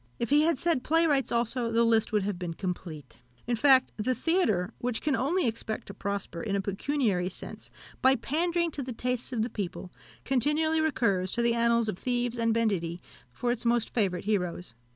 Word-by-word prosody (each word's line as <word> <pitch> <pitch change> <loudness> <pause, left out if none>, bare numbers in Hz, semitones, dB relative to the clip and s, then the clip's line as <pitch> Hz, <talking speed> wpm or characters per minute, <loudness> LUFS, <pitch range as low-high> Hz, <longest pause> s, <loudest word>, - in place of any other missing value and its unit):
If 235 - -3
he 295 +1 +6
had 325 -1 +2
said 330 -3 +1
playwrights 300 -6 +2
also, 235 0 0
the 230 +1 +3
list 225 -1 +2
would 210 -2 +1
have 195 -2 -3
been 170 -2 -4
complete. 160 -9 -6 0.2
In 240 - 0
fact, 260 +2 +5
the 250 +4 0
theatre, 230 - +1
which 245 -2 -2
can 295 -3 0
only 285 +9 +1
expect 220 -1 -3
to 200 - -9
prosper, 200 -4 -4
in 200 -3 -2
a - - +1
pecuniary 200 -2 0
sense, 190 - -10 0.3
by 260 +1 +5
pandering 340 +4 0
to 285 - -4
the 255 -1 -5
tastes 250 +2 -2
of 230 -3 0
the 235 - -2
people, 185 -2 -5 0.3
continually 300 +5 +2
recurs 200 -12 +1
to 235 - +1
the 235 0 +3
annals 235 -1 +2
of 200 -4 -3
thieves 245 -1 -1
and 230 0 +2
banditti 195 -7 0 0.3
for 240 - -1
its 245 - -3
most 235 -1 +1
favourite 195 -6 0
heroes. 180 - -1
235 Hz, 195 wpm, -28 LUFS, 200-265 Hz, 0.3 s, he